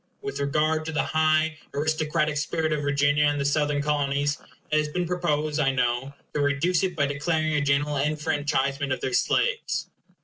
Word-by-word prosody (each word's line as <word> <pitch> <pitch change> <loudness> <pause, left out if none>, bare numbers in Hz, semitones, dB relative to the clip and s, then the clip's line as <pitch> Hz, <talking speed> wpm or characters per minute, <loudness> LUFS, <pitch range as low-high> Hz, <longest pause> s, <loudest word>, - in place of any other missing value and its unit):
With 415 - -4
regard 155 +2 +1
to 160 - -3
the 155 - 0
high 155 0 +1 0.2
aristocratic 155 +1 0
spirit 155 +1 -1
of 150 - -1
Virginia 145 +1 +2
and 145 0 +1
the 140 - -1
Southern 145 0 +1
Colonies, 145 -1 0 0.3
it 155 - +4
has 150 - 0
been 175 +4 -2
proposed, 155 -4 -1
I 140 -2 +3
know, 130 +1 -1 0.2
to 150 - 0
reduce 145 +5 +1
it 185 -2 -1
by 145 -3 +2
declaring 155 +2 0
a 150 - +2
general 145 +1 +1
enfranchisement 145 -1 0
of 130 - 0
their 130 - -2
slaves. - - 0
150 Hz, 175 wpm, -25 LUFS, 145-155 Hz, 0.3 s, it